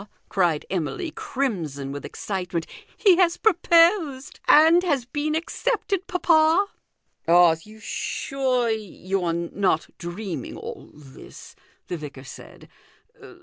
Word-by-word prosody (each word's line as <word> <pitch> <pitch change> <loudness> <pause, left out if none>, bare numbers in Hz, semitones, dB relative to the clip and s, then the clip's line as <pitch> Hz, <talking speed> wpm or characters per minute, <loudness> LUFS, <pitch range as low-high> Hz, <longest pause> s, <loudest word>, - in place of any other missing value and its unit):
cried 175 -6 +1
Emily, 195 - -3
crimson 165 - -3
with 145 0 -6
excitement, 180 -4 -4 0.2
" - - -31
he 370 -4 +7
has 350 -2 +3
proposed 335 -7 +3
and 325 +3 +7
has 290 -9 0
been 295 +4 -2
accepted, 400 +3 -2
papa." 330 +1 +3 0.3
" - - -47
Are 170 -1 +6
you 215 +4 -15
sure 255 +2 -1
you 195 -3 -3
are 170 - 0
not 170 0 -1
dreaming 190 - -6
all 455 -1 -9
this?" 140 -3 -14 0.3
the 175 - -4
vicar 145 -4 -9
said. 125 - -12
245 Hz, 120 wpm, -24 LUFS, -, 0.3 s, he